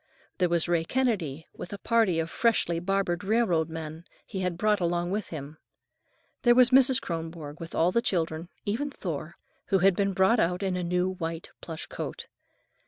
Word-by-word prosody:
There 180 -2 +3
was 170 -1 +2
Ray 170 -1 +2
Kennedy, 175 - -1
with 175 - -8
a 200 - -5
party 225 -6 +2
of 165 0 -2
freshly 210 -8 +1
barbered 180 -1 0
railroad 195 -7 +2
men 160 0 -6 0.2
he 195 - -5
had 180 -2 -1
brought 210 +2 +2
along 175 0 0
with 210 +2 -2
him. 150 0 -7 0.8
There 240 -1 +5
was 250 0 +6
Mrs. 265 0 +6
Kronborg 165 -3 -6
with 165 0 -7
all 170 +2 +3
the 235 - +2
children, 165 -5 -1 0.2
even 235 +8 -1
Thor, 170 - -5 0.3
who 195 - +3
had 190 0 +4
been 200 0 +1
brought 190 +5 +4
out 180 +2 +1
in 190 -2 0
a 180 - -1
new 180 +1 +1
white 165 -2 -5
plush 160 -2 -6
coat. - - -6
180 Hz, 180 wpm, -28 LUFS, 165-205 Hz, 0.8 s, was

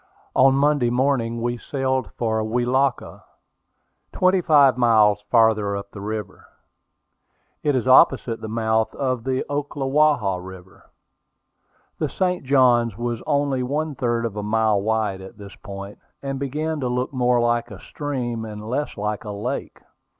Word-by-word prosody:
On 135 +1 +5
Monday 140 -3 +2
morning 120 -2 0
we 120 0 -2
sailed 130 -2 -2
for 110 -2 0
Welaka, 125 +4 -1 0.9
twenty 185 0 +2
five 145 -5 +5
miles 110 -4 +4
farther 110 -4 +3
up 100 0 -8
the 100 - -9
river. 105 0 -6 1.1
It 145 -2 +1
is 130 -1 -1
opposite 130 -2 +4
the - - -5
mouth 110 0 0
of 130 -4 -2
the 130 0 -1
Ocklawaha 145 -7 +1
River. 95 0 -13 1.1
The - - -1
St. 180 -3 -1
Johns 125 -5 +3
was 120 -1 -3
only 140 -3 +1
one 150 +4 -2
third 120 -3 -1
of 110 -3 -4
a 105 - -3
mile 105 -1 +1
wide 110 -2 -1
at 95 +4 -12
this 100 -2 -11
point, 100 +1 -9 0.2
and 135 -1 -3
began 150 +3 -3
to 130 - -2
look 125 +3 -2
more 125 -1 +2
like 120 0 0
a 105 -4 -10
stream 125 -5 -4
and 105 -1 -8
less 135 +4 -3
like 105 +1 -3
a 105 - -7
lake. 115 +7 -5
120 Hz, 150 wpm, -22 LUFS, 110-135 Hz, 1.1 s, On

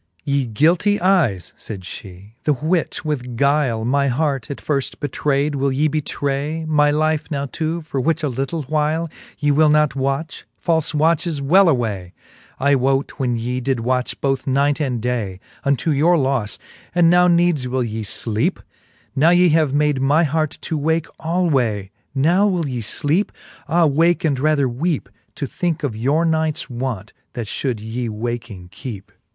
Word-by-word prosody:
XXV. 80 +1 -42
Ye 140 -1 0
guilty 170 - +2
eyes, 160 - +1
fayd 100 -3 -7
fhe, 95 +2 -10
the 150 - +4
which 155 +6 -1
with 125 -6 -3
guyle 140 -5 +2
My 140 +3 +2
heart 135 -2 -1
at 140 - -4
firft 140 -3 -2
betrayd, 145 +1 0
will 140 0 0
ye 145 +4 +2
betray 150 +1 -2
My 150 -2 +3
life 155 +1 0
now 140 -2 -2
to, 165 +1 -2
for 140 -4 -3
which 160 +3 0
a - - +2
little 135 +4 -2
whyle 155 +3 -1 0.3
Ye 145 0 +1
will 155 +2 +4
not 150 -2 +3
watch? 140 +4 -2
falfe 160 -2 0
watches, 160 0 +1
well 175 +7 +5
away, 105 - -1 0.5
I 140 +2 +3
wote 135 +1 0
when 125 -3 0
ye 125 +2 -2
did 130 -2 -1
watch 125 +1 -1
both 135 -1 -1
night 140 +2 +2
and 130 -5 -1
day 110 -6 -2 0.2
Unto 140 +3 +1
your 155 +5 +4
lofle; 130 -7 0 0.4
and 175 -1 +5
now 180 +1 +5
needes 170 -6 +2
will 130 0 0
ye 110 -1 -4
fleepe? 115 - 0 0.6
Now 155 +5 +5
ye 180 0 +5
have 155 -3 +3
made 145 -1 +1
my 145 +5 +3
heart 155 0 -1
to 160 -3 -2
wake 160 +2 +1
alway, 135 - 0 0.2
Now 175 +9 +3
will 175 -6 0
ye 125 -3 -3
fleepe? 145 - 0 0.4
Ah 170 +2 +3
wake, 165 +5 +2
and 140 -4 +1
rather 145 -1 +2
weepe, 145 +6 -2 0.3
To 140 - -3
thinke 165 +3 -2
of 130 -7 -2
your 140 +9 +1
nights 160 -4 0
want, 120 -5 -4 0.2
that 120 -4 -4
fhould 120 +2 -2
yee 115 +2 -4
waking 110 -4 -5
kecpe. 100 0 -8
140 Hz, 170 wpm, -20 LUFS, 125-160 Hz, 0.6 s, well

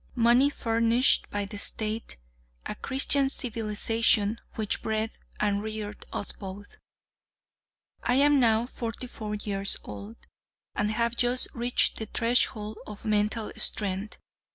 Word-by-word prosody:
Money 240 +3 +4
furnished 230 0 +2
by 205 0 -2
the 205 +1 -7
State 220 +2 -1 0.5
a - - -3
Christian 270 +1 +1
civilization 225 -2 +2
which 215 -2 -1
bred 220 0 -1 0.3
and 205 -1 +1
reared 215 -1 -6
us 200 - -1
both. 200 +1 -10 1.3
I 245 - +1
am 285 +1 +5
now 230 -2 +3
forty 235 -1 -6
four 215 -3 -5
years 200 -1 +1
old, 105 +2 -9 0.6
and 210 0 0
have 235 +2 0
just 245 +1 +2
reached 240 +1 +1
the 220 - -5
threshold 220 -2 +1
of 210 -1 -10
mental 215 +1 0
strength. 200 0 0
220 Hz, 125 wpm, -27 LUFS, 210-235 Hz, 1.3 s, am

